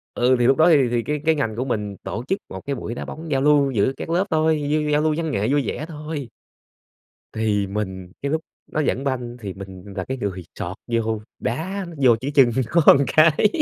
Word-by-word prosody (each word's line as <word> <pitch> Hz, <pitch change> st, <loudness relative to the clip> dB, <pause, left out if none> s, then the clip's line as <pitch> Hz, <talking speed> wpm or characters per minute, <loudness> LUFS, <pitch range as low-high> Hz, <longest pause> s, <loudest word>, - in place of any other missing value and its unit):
Ừ, 125 Hz, +1 st, +3 dB
thì 120 Hz, -, +3 dB
lúc 135 Hz, -, +4 dB
đó 160 Hz, +2 st, +6 dB
thì 140 Hz, -7 st, +5 dB
thì 120 Hz, -1 st, 0 dB
cái 150 Hz, +2 st, -2 dB
cái 160 Hz, 0 st, +4 dB
ngành 115 Hz, -7 st, -1 dB
của 125 Hz, +3 st, -2 dB
mình 105 Hz, -5 st, -3 dB
tổ 115 Hz, -, -4 dB
chức 195 Hz, -, 0 dB
một 95 Hz, -, -7 dB
cái 140 Hz, -, -2 dB
buổi 115 Hz, -1 st, -5 dB
đá -, -, -5 dB
bóng 160 Hz, 0 st, -8 dB
giao 135 Hz, -, +2 dB
lưu 145 Hz, -1 st, +4 dB
giữa 115 Hz, +1 st, +2 dB
các -, -, -6 dB
lớp 180 Hz, +4 st, +1 dB
thôi, 155 Hz, -1 st, +2 dB
như 150 Hz, +1 st, 0 dB
giao 150 Hz, 0 st, +3 dB
lưu 155 Hz, 0 st, +2 dB
văn 160 Hz, -2 st, -2 dB
nghệ 105 Hz, -4 st, 0 dB
vui 145 Hz, 0 st, +2 dB
vẻ 155 Hz, -, -3 dB
thôi. 150 Hz, -4 st, -6 dB, 1.0 s
Thì 105 Hz, -2 st, 0 dB
mình 95 Hz, -3 st, -4 dB
cái 140 Hz, +1 st, -2 dB
lúc 160 Hz, -, 0 dB, 0.3 s
nó -, -, -1 dB
dẫn 140 Hz, -3 st, 0 dB
banh 125 Hz, -3 st, -3 dB
thì 100 Hz, -4 st, -6 dB
mình 95 Hz, -1 st, -10 dB
là 95 Hz, -, -2 dB
cái 130 Hz, -, -4 dB
người 95 Hz, -6 st, -4 dB
chọt 90 Hz, +3 st, -5 dB
vô, 110 Hz, -2 st, -1 dB, 0.2 s
đá 185 Hz, +10 st, -3 dB, 0.2 s
vô 120 Hz, -3 st, +7 dB
cái 140 Hz, +3 st, -3 dB
chân 130 Hz, -4 st, +7 dB, 0.4 s
nó -, -, +10 dB
cái. 160 Hz, +6 st, +4 dB
135 Hz, 230 wpm, -22 LUFS, 110-150 Hz, 1.0 s, nó